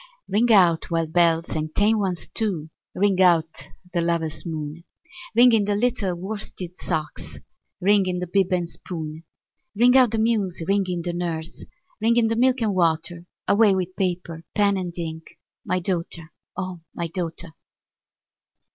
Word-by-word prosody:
Ring 230 +4 +2
out, 175 -6 +4
wild 165 -2 -1
bells, 170 -1 +3
and 155 0 -4
tame 215 +2 +3
ones 185 -4 -2
too! 180 -9 -1 0.2
Ring 195 -1 +2
out 165 -3 +2 0.3
the 170 - +1
lover's 170 -1 -1
moon! 155 0 -5 0.5
Ring 245 +1 +7
in 220 -3 +3
the 205 0 0
little 215 -5 0
worsted 185 -1 -6
socks! 155 -4 -4 0.4
Ring 200 0 +3
in 180 -1 -1
the 180 - -2
bib 190 +1 +1
and 175 -2 +1
spoon! 160 -2 -7 0.5
Ring 245 +4 +5
out 255 -2 +6
the 225 - -2
muse! 215 -6 0
ring 200 0 +2
in 175 -2 -3
the 175 0 -3
nurse! 165 -2 -4 0.4
Ring 230 +2 +3
in 225 -2 +3
the 225 - 0
milk 255 +1 +2
and 210 -2 +1
water! 170 -1 0 0.2
Away 205 -1 +5
with 185 0 -3
paper, 175 -3 -3
pen, 205 -1 +3
and 180 -2 -4
ink 160 -1 -6 0.3
My 185 - 0
daughter, 170 -3 -3 0.3
O 185 -3 -5
my 170 - -2
daughter! 170 -1 -5
180 Hz, 160 wpm, -23 LUFS, 165-205 Hz, 0.5 s, Ring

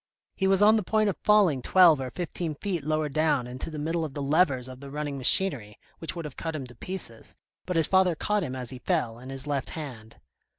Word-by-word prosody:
He 190 - 0
was 195 +1 +3
on 215 +2 +6
the - - 0
point 215 +2 +1
of - - -10
falling 200 -11 +4
twelve 170 -2 +5
or 130 - -4
fifteen 170 0 -4
feet 175 -1 -3
lower 155 +1 0
down 150 -3 +1
into 125 +5 -6
the 155 - -7
middle 165 +3 -2
of 150 -4 -6
the 145 - -4
levers 140 -4 +2
of 130 0 -10
the 140 0 -10
running 145 0 -4
machinery 130 - +4 0.2
which 165 - -5
would 170 -2 -6
have 145 - -8
cut 165 -1 -4
him 140 -4 -5
to 125 - -13
pieces, 120 -5 -5 0.3
but 180 - -2
his 165 -1 +4
father 190 -1 +3
caught 210 +6 0
him 130 -7 -4
as 125 -1 -5
he 130 - -8
fell, 125 -9 -1
in 130 +2 -11
his 135 0 -6
left 145 -3 -2
hand. 120 -8 -8
150 Hz, 240 wpm, -27 LUFS, 130-180 Hz, 0.3 s, on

